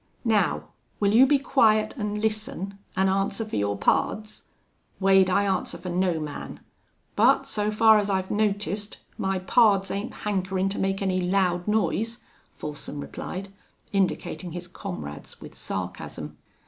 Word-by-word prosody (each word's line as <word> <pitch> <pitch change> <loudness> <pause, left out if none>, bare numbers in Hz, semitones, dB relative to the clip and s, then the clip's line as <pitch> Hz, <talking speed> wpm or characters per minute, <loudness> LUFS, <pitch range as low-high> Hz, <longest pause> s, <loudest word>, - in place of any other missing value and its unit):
Now, 215 -5 +1 0.3
will 205 0 +2
you 255 +4 +7
be 290 +1 +5
quiet 220 -6 +3
an' 210 -4 -2
listen 215 -3 -2 0.2
an' 190 0 +3
answer 195 +3 0
for 215 - -6
your 100 0 0
pards?" 215 - 0 0.5
"Wade, 190 -1 +5
I 200 +2 +3
answer 190 -2 -1
fer 180 - -7
no 180 -2 +1
man. 150 -2 -6 0.6
But, - - +4
so 210 0 -1
far 220 0 +6
as 205 0 -1
I've 190 -1 -1
noticed, 205 -1 0 0.2
my 190 0 0
pards 195 0 +3
ain't 200 +4 -5
hankerin' 190 -1 0
to 195 - -4
make 195 +1 0
any 185 -1 +1
loud 180 -1 +1
noise," 220 +2 0 0.3
Folsom 150 -1 -7
replied, 190 +6 -6 0.4
indicating 185 -2 -1
his 175 0 -6
comrades, 75 - -7
with - - -11
sarcasm. - - -6
195 Hz, 145 wpm, -26 LUFS, 185-215 Hz, 0.6 s, you